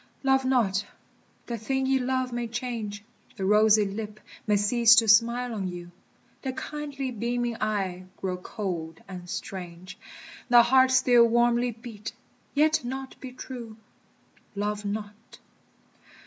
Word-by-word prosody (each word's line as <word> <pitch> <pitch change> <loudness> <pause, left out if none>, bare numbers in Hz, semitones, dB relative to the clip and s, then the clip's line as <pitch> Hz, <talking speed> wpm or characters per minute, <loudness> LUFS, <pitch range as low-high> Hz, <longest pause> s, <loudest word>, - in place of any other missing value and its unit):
Love 265 0 +3
not! 215 -7 +2 0.6
the 235 -2 -4
thing 265 +4 -1
ye 265 0 +2
love 255 0 -1
may 240 0 -2
change; 225 -3 -4 0.3
The 190 - -2
rosy 210 +1 +5
lip 210 +1 -6 0.3
may 210 - +3
cease 225 +2 +5
to 225 - +5
smile 235 +3 +4
on 200 -4 -3
you, 175 -1 -7 0.5
The 265 -2 -3
kindly 280 -1 -5
beaming 240 +1 -2
eye 195 -4 -2
grow 185 -1 -3
cold 175 -4 -5
and 180 -2 -9
strange, 185 -1 -7 0.5
The 240 -1 +8
heart 260 +2 +5
still 250 -2 +5
warmly 240 +1 +3
beat, 225 -1 -8 0.4
yet 310 +1 +3
not 265 +2 -5
be 260 - -8
true. 240 -3 -8 0.8
Love 210 +1 -2
not! 210 +2 -6
230 Hz, 135 wpm, -27 LUFS, 205-250 Hz, 0.8 s, The